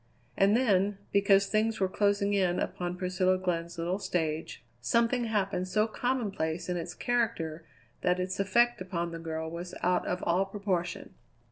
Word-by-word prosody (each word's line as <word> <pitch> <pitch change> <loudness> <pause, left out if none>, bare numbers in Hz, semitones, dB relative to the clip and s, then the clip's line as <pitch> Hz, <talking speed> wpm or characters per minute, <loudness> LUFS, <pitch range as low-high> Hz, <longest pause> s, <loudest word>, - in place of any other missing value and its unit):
And 200 +3 +4
then, 205 -5 +2
because 200 0 +4
things 215 +2 0
were 190 - +2
closing 200 +1 +1
in 185 -3 +2
upon 180 -1 -3
Priscilla 185 0 +1
Glenn's 170 -2 -2
little 175 +3 -1
stage, 160 -5 -2 0.2
something 235 - +2
happened 200 -4 0
so 210 +3 +2
commonplace 200 -9 -2
in 180 - 0
its 175 0 -4
character 195 -10 -1 0.3
that 180 0 +2
its 185 +1 -2
effect 235 +4 +3
upon 170 -2 -3
the 165 - -6
girl 160 -1 -4
was 175 +1 -6
out 180 +1 +2
of 180 - -2
all 180 +3 +2
proportion. 195 -3 -3
185 Hz, 155 wpm, -30 LUFS, 175-205 Hz, 0.3 s, And